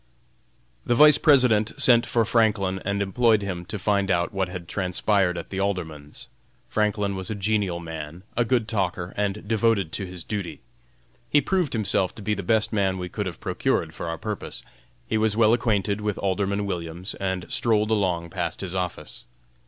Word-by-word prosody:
The 120 - +1
Vice 150 +2 +7
President 125 -7 +4
sent 120 -4 +5
for 115 -2 +2
Franklin, 105 -4 +1
and 100 +1 0
employed 110 +1 +2
him 90 -3 -4
to 105 - -4
find 100 -1 +1
out 85 -1 +1
what 95 -2 -1
had 90 -2 -7
transpired 95 0 +1
at 85 - -7
the 95 - -3
Alderman's. 80 -7 -4 0.4
Franklin 105 -2 0
was 95 +2 -5
a 110 - -2
genial 100 -3 0
man, 80 0 -7
a 120 - +3
good 120 -2 +1
talker, 95 -4 -2
and 100 0 -2
devoted 110 -5 +2
to 95 +1 -3
his 90 -2 -8
duty. 100 -5 -5 0.7
He 145 - +5
proved 180 +1 0
himself 100 -4 0
to 105 - -9
be 105 +1 0
the 100 - -3
best 110 +4 +1
man 95 -3 +1
we 90 -1 -5
could 105 +2 -3
have 85 - -6
procured - - -1
for - - -6
our 80 0 -3
purpose. 105 +2 -5 0.4
He 110 - 0
was 110 -1 +1
well 110 -1 +5
acquainted 105 -4 +1
with 105 -1 -2
Alderman 100 +1 -1
Williams, 85 0 -4
and 95 -2 -2
strolled 110 -2 +1
along 90 -6 0
past - - -3
his 95 -2 -4
office. 90 -2 -4
100 Hz, 180 wpm, -25 LUFS, 90-110 Hz, 0.7 s, Vice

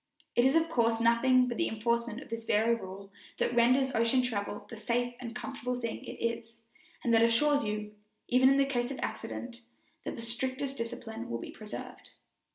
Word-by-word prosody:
It 240 - +5
is 265 +3 +4
of 325 0 +4
course 230 -7 +2
nothing 250 +2 +4
but 240 - -3
the 340 - +1
enforcement 235 +1 -1
of - - -17
this 230 0 -4
very 225 +2 +3
rule 195 -2 -6 0.3
that - - 0
renders 255 +3 +4
ocean 230 +3 +3
travel 205 -4 -3
the - - -8
safe 240 +2 -1
and 235 -2 -7
comfortable 245 +1 -3
thing 230 -2 -4
it - - -6
is, 230 0 -3 0.4
and 235 - +2
that 225 - +6
assures 285 +6 +4
you, 210 0 -3 0.3
even 255 +1 +5
in 275 0 +4
case 245 -3 0
of 275 - -5
accident, 240 -1 -5 0.4
that - - -4
the 230 - -7
strictest 260 +4 -3
discipline 230 -1 -5
will 115 - -2
be - - -7
preserved. 215 -1 -9
235 Hz, 185 wpm, -31 LUFS, 225-255 Hz, 0.4 s, that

